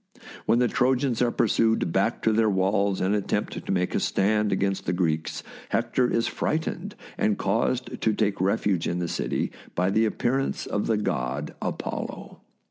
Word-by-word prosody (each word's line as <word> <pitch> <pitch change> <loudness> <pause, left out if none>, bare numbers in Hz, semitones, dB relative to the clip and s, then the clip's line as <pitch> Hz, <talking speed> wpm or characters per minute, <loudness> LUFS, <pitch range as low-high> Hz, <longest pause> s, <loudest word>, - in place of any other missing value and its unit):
When 115 - +4
the 125 0 +3
Trojans 130 0 +1
are 120 - +4
pursued 115 -4 +2
back 100 +6 0
to 110 - +3
their 110 0 +3
walls 100 0 +1
and 95 +2 +2
attempt 105 -2 -1
to - - -4
make 90 -1 0
a - - +2
stand 105 +1 +1
against 95 0 0
the 85 - +1
Greeks, 80 -3 -1 0.3
Hector 120 +2 +1
is 115 - +1
frightened 170 +5 -2 0.2
and 105 -2 +2
caused 115 +5 -1
to 110 - +3
take 105 -3 0
refuge 95 -2 +1
in 85 - -1
the 90 -1 -1
city - - -2 0.2
by 90 +2 +1
the 110 +3 +3
appearance 125 +5 -1
of 105 - -2
the 110 - +2
god 65 -6 -2
Apollo. - - -5
105 Hz, 170 wpm, -26 LUFS, 95-115 Hz, 0.3 s, When